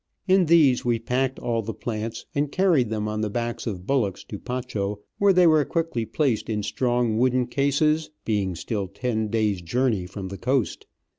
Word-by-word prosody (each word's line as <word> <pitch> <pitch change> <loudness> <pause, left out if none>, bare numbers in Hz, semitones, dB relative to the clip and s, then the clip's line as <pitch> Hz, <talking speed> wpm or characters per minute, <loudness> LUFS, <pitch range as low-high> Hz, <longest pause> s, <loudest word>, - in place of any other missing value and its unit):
In 185 -2 +4
these 150 -6 +5
we 120 -1 +1
packed 125 +3 -1
all 115 -1 -1
the 115 +1 -5
plants, 115 0 -4
and 145 0 0
carried 170 - +3
them 105 -1 -2
on 105 0 -2
the 110 - -1
backs 120 +2 -3
of 95 -4 -4
bullocks 110 -8 0
to - - -8
Pacho, 110 -5 -3 0.2
where 200 0 +5
they 180 -1 +5
were 155 -2 +5
quickly 160 -9 -2
placed 120 -1 0
in 105 -2 -1
strong 120 0 0
wooden 125 0 +2
cases, 150 +4 +1 0.2
being 100 -5 0
still 100 +3 -3
ten 110 +2 -2
days' 105 -3 0
journey 110 0 0
from 95 +1 -7
the 100 - -7
coast. 130 -1 -1
120 Hz, 180 wpm, -25 LUFS, 105-135 Hz, 0.2 s, these